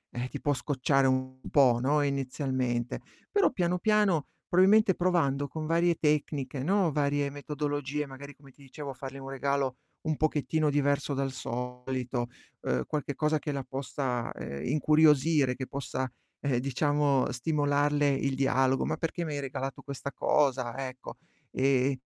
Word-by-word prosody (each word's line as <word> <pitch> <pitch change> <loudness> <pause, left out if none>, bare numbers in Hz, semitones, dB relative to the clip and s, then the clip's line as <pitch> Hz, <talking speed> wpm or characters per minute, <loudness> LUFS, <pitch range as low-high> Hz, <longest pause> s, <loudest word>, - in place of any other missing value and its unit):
eh, 125 +1 -2
ti - - -6
può 145 - +2
scocciare 135 +1 +1
un 130 0 -1
po', 130 -5 +5
no, 145 +3 +2
inizialmente. 130 -3 -1 0.3
Però 405 -1 +4
piano 180 -5 0
piano 205 -6 +2 0.2
probabilmente 195 +3 +5
provando 150 -7 +1
con 155 +1 -5
varie 170 +1 +2
tecniche, 145 -3 0
no, 185 +3 +2
varie 145 -1 0
metodologie 145 0 -3
magari 140 +1 -10
come 140 -1 -17
ti 140 - -23
dicevo 140 +1 -7
a - - -8
fargli 135 +1 -8
un 135 0 -8
regalo 135 -1 -1 0.2
un 155 -1 -1
pochettino 155 0 +1
diverso 140 0 +1
dal 135 0 -1
solito, 125 0 -3 0.3
uhm, 65 0 0
qualche 145 -2 -3
cosa 150 +1 +1
che 150 - -3
la 140 -1 -3
possa, 130 -2 -3
ehm, 70 +2 -6
incuriosire, 150 -3 +4
che 130 - -4
possa, 130 -1 -3 0.3
eh, 135 -4 +1
diciamo 140 +1 +1
stimolarle 145 +2 +1
il 135 0 0
dialogo: 135 0 +2
"Ma - - -1
perché 170 +1 -2
mi 155 - -3
hai 145 - -2
regalato 135 0 -4
questa 140 0 -6
cosa?" 130 -5 +1
Ecco. 130 0 -9 0.4
Ehm, 135 0 +2
140 Hz, 150 wpm, -29 LUFS, 130-150 Hz, 0.4 s, po